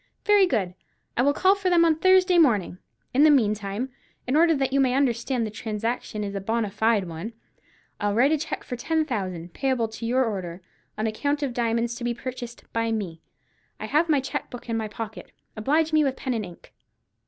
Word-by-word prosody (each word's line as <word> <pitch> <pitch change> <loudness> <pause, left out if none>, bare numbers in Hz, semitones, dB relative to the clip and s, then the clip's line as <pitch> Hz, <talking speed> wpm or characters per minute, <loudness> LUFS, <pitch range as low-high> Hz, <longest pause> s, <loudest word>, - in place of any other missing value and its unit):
"Very 410 -2 +5
good. 200 - -1 0.4
I - - +2
will 280 +3 +4
call 375 +6 +4
for 395 -2 -1
them 340 -1 +5
on 325 -1 +4
Thursday 370 -1 +5
morning. 210 - +2 0.3
In 265 - +3
the 310 - +7
meantime, 215 -2 +1 0.4
in 255 - 0
order 330 +1 +5
that 270 -1 -1
you 275 - +3
may 260 -2 +3
understand 250 -2 +1
that 215 - -5
the - - -19
transaction 220 0 -3
is 200 -1 -4
a 195 - -3
bonâ 220 +1 -1
fide 220 -3 +2
one, 170 +8 -6 0.7
I'll 205 -1 0
write 260 +6 +4
a 315 - +3
cheque 315 - -4
for 250 - -5
ten 315 +6 0
thousand, 185 - -4
payable 260 -4 0
to 230 +1 -6
your 255 +2 +2
order, 185 -5 -5 0.3
on 215 - -1
account 285 +7 -1
of 265 -3 -2
diamonds 235 0 0
to 245 - -7
be 240 0 -1
purchased 245 -1 -7
by 230 0 0
me. 185 -7 -3 0.6
I - - -4
have 320 +3 +1
my 295 -3 +4
cheque 270 - -4
book 245 -1 -10
in 230 - 0
my 220 -1 -2
pocket. 220 +1 -8 0.2
Oblige 305 +8 +1
me 310 -1 +5
with 270 -2 0
pen 260 -1 -3
and 220 -3 -2
ink." 175 - -15
240 Hz, 210 wpm, -25 LUFS, 215-285 Hz, 0.7 s, the